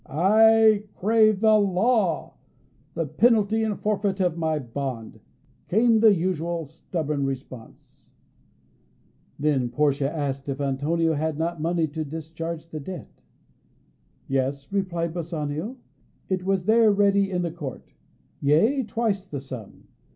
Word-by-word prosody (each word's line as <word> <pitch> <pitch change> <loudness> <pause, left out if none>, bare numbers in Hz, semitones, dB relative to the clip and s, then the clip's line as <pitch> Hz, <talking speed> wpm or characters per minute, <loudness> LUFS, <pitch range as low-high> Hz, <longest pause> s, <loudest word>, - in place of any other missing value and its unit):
"I 215 +5 +4
crave 215 0 +3
the 215 -1 +5
law, 200 -2 +1 0.6
the 165 - -1
penalty 220 - +2
and 215 -2 -2
forfeit 205 -2 -1
of 180 -3 +1
my 160 -2 -1
bond," 130 -3 -5 0.5
came 225 +3 +3
the 220 -1 +7
usual 170 -1 -2
stubborn 155 -1 -4
response. 130 -3 -8 1.3
Then 140 -4 +1
Portia 140 +2 +1
asked 140 -3 -3
if 135 0 -3
Antonio 150 +4 0
had 155 0 -2
not 165 0 -2
money 165 0 +1
to 155 +2 -4
discharge 160 +2 -6
the 155 - -6
debt. 180 +6 -9 1.1
Yes, 135 +4 -2
replied 170 -4 -1
Bassanio, 165 - -4 0.5
it 185 -1 -1
was 190 -2 0
there 220 0 +5
ready 200 -1 +3
in 180 -2 -1
the 170 - -2
court 150 -6 -8 0.5
yea, 170 - +3
twice 220 -5 -2
the 145 -6 -5
sum. 130 -6 -10
170 Hz, 125 wpm, -25 LUFS, 145-200 Hz, 1.3 s, the